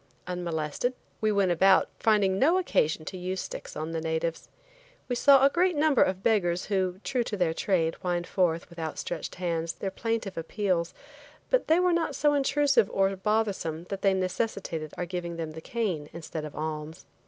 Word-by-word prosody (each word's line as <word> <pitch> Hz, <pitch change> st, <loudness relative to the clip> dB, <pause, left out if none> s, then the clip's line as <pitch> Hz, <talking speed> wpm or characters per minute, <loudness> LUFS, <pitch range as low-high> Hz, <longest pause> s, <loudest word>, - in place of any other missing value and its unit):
Unmolested 175 Hz, -, -2 dB, 0.3 s
we 215 Hz, -1 st, +2 dB
went 200 Hz, -3 st, +2 dB
about 190 Hz, +3 st, +5 dB
finding 200 Hz, -3 st, +3 dB
no 325 Hz, +7 st, +4 dB
occasion 155 Hz, -, +1 dB
to 185 Hz, -, -6 dB
use 185 Hz, +1 st, -3 dB
sticks -, -, -7 dB
on 155 Hz, +2 st, -4 dB
the 165 Hz, -1 st, -2 dB
natives. 160 Hz, +1 st, -2 dB, 0.6 s
We 245 Hz, -, -1 dB
saw 275 Hz, +2 st, +6 dB
a -, -, +6 dB
great 355 Hz, +1 st, +2 dB
number 295 Hz, -3 st, +3 dB
of 185 Hz, +1 st, +1 dB
beggars 180 Hz, -6 st, +2 dB
who, 190 Hz, -2 st, -1 dB
true 250 Hz, -2 st, 0 dB
to 210 Hz, -, -3 dB
their 175 Hz, -3 st, +1 dB
trade, 165 Hz, -2 st, +1 dB
whined 175 Hz, -2 st, -1 dB
forth, 175 Hz, -3 st, 0 dB
with 170 Hz, -, -11 dB
outstretched 160 Hz, +1 st, -4 dB
hands, 170 Hz, -2 st, -2 dB
their 195 Hz, -, -4 dB
plaintive 220 Hz, -4 st, -2 dB
appeals, 175 Hz, 0 st, -1 dB, 0.6 s
but -, -, +2 dB
they 320 Hz, +2 st, +4 dB
were 360 Hz, -1 st, +3 dB
not 335 Hz, -1 st, 0 dB
so 295 Hz, -1 st, +3 dB
intrusive 275 Hz, -5 st, +3 dB
or 195 Hz, 0 st, +2 dB
bothersome 195 Hz, -5 st, -1 dB
that 195 Hz, -1 st, -4 dB
they 195 Hz, -1 st, +3 dB
necessitated 185 Hz, -4 st, -2 dB
our 175 Hz, -, -2 dB
giving 175 Hz, -1 st, -4 dB
them 165 Hz, -2 st, -4 dB
the 160 Hz, +1 st, -9 dB
cane 180 Hz, -9 st, -2 dB
instead 160 Hz, -2 st, -6 dB
of 150 Hz, -, -9 dB
alms. 155 Hz, +1 st, -5 dB
185 Hz, 180 wpm, -28 LUFS, 165-220 Hz, 0.6 s, saw